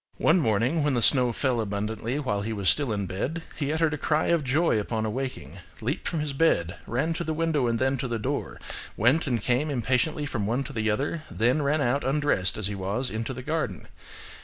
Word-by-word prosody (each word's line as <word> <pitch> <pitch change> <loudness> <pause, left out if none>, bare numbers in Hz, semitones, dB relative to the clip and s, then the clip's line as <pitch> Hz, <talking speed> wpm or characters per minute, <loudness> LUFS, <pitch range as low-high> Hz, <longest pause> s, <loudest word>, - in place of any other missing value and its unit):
"One 175 +3 +4
morning, 125 +5 +2
when 145 -3 +2
the 120 - +1
snow 125 -1 +5
fell 125 0 0
abundantly 110 +4 -2
while 130 -8 -1
he 110 +2 -3
was 100 -3 -2
still 145 -5 +2
in 100 -2 -1
bed, 130 - -3
he 145 -1 -2
uttered 160 -1 +1
a 150 - -3
cry 155 0 +1
of 170 -3 +2
joy 140 -2 +2
upon 110 +1 -2
awaking, 110 - -4 0.2
leaped 125 +7 -2
from 165 -3 -1
his 150 -2 -2
bed, 100 - +1
ran 140 +8 0
to 170 - -3
the 160 -1 -2
window 155 -5 +1
and 115 0 +1
then 130 +2 +1
to 130 - -2
the 120 -1 -2
door; 110 - -3 0.4
went 130 +9 +3
and 120 -5 0
came 130 +5 +1
impatiently 135 +4 0
from 110 -8 -2
one 120 +5 0
to - - -8
the 110 -1 0
other; 140 +9 -1
then 125 +7 +1
ran 145 +2 +1
out 135 +2 +1
undressed 135 - +1
as 110 - -2
he 100 - -1
was 100 +7 -2
into 115 +4 -3
the 130 0 -6
garden. 125 - -2
130 Hz, 220 wpm, -26 LUFS, 110-150 Hz, 0.4 s, snow